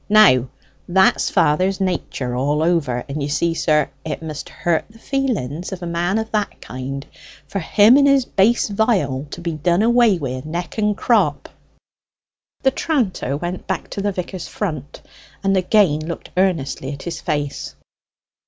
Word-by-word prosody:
Now 135 - +6 0.4
that's 175 -7 +3
father's 185 +6 +2
nature 140 -9 -2
all 145 +4 +1
over; 145 -8 +1
and 145 +2 -4
you 140 - -2
see, 165 +3 +1
sir, 150 -4 +1
it 155 0 -5
must 155 -3 -6
hurt 170 -2 -1
the 220 - -17
feelings 215 - -2
of 185 -2 -6
a - - -3
man 175 +4 0
of 220 0 -3
that 210 -2 -1
kind 135 +2 -6 0.4
for 195 - -3
him 210 +8 +5
and 280 0 +5
his 275 -2 +4
bass 225 +4 +2
viol 190 - 0
to 170 - -7
be 170 -1 -2
done 170 +6 +1
away 235 -4 +4
wi' 130 -4 -4
neck 175 +7 -5
and 210 -1 +1
crop." 235 - +1 1.1
The 265 - +4
tranter 215 - -1
went 175 +3 -5
back 190 -2 -3
to 200 - -3
the 205 +1 0
vicar's 185 -1 -5
front 155 -9 -5 0.4
and 195 0 +2
again 185 -4 +3
looked 165 +2 -6
earnestly 165 -8 0
at 140 - -9
his 170 -2 -5
face. 145 -2 -3
175 Hz, 160 wpm, -20 LUFS, 145-205 Hz, 1.1 s, Now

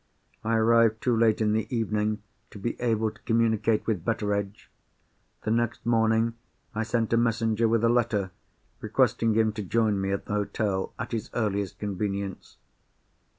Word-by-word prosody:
I 115 +1 +1
arrived 115 0 +3
too 125 -2 +2
late 110 -1 +3
in 105 -1 +2
the 110 0 0
evening 105 -2 -1 0.3
to - - -11
be 115 +4 -3
able 110 -2 +1
to - - -21
communicate 115 -1 +1
with 105 -7 -1
Betteredge. 105 -2 -2 0.7
The 110 - -1
next 120 0 0
morning, 115 0 +2 0.4
I 110 - -2
sent 115 0 0
a - - +4
messenger 115 -1 +2
with 115 0 +2
a - - +5
letter, 110 -5 +1 0.5
requesting 115 -1 +1
him 110 -1 +3
to 105 - -4
join 105 0 +1
me 95 0 -1
at 100 - -2
the - - -4
hotel, 105 -2 -1
at 105 - -5
his 115 -3 -3
earliest 100 -4 -1
convenience. 100 -1 -4
110 Hz, 160 wpm, -27 LUFS, 105-115 Hz, 0.7 s, a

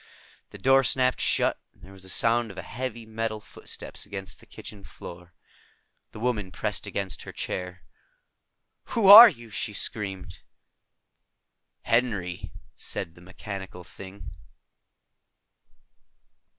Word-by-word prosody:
The - - -11
door 135 +1 +4
snapped 130 0 +1
shut, - - +1
and - - -26
there 95 - -13
was 95 -1 -13
a 95 - -7
sound 115 +4 +2
of 100 - -11
heavy 120 +2 -5
metal 110 0 -3
footsteps - - -7
against 95 -2 -7
the - - -19
kitchen 100 -2 -10
floor. 90 -2 -11 0.8
The - - -10
woman 110 -6 -1
pressed - - -3
against 95 -6 -4
her - - -8
chair. 90 0 -5 1.1
"Who 225 - +3
are 215 +4 +13
you?" 115 - -11
she 105 0 -3
screamed. 95 -4 -4 1.4
"Henry," 105 -8 0 0.2
said 80 - -4
the 85 - -17
mechanical 95 0 -8
thing. 95 +6 -11
100 Hz, 120 wpm, -26 LUFS, 95-115 Hz, 1.4 s, are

